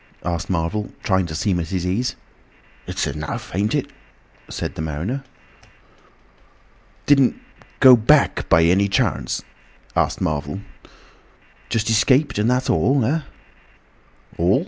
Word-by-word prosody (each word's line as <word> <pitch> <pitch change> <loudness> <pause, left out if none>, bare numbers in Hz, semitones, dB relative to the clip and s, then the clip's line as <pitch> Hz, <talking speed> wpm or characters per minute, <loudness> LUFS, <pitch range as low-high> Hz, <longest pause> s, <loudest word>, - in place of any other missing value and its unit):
asked 85 -2 -3
Marvel, 90 +4 -1
trying 95 -3 +1
to 80 - -6
seem 90 +2 0
at 80 - -3
his 90 0 -3
ease. 105 +8 -1 0.7
"It's - - -2
enough, 75 +1 -5
ain't 100 +4 0
it?" - - -2 0.6
said - - -4
the - - -6
mariner. 85 - -3 1.8
"Didn't 140 -3 +4 0.4
go 130 -2 +10
Back 140 +6 +2
by 80 - +5
any 95 +4 +3
chance?" 100 - -1 0.5
asked - - +1
Marvel. 75 +3 -2 1.1
"Just 115 -1 -1
escaped 130 +3 +3
and 110 +3 +2
that's 125 +1 +1
all, 135 -3 +2
eh?" 155 +7 0 1.2
"All!" 90 +9 +3
100 Hz, 125 wpm, -21 LUFS, 85-125 Hz, 1.8 s, go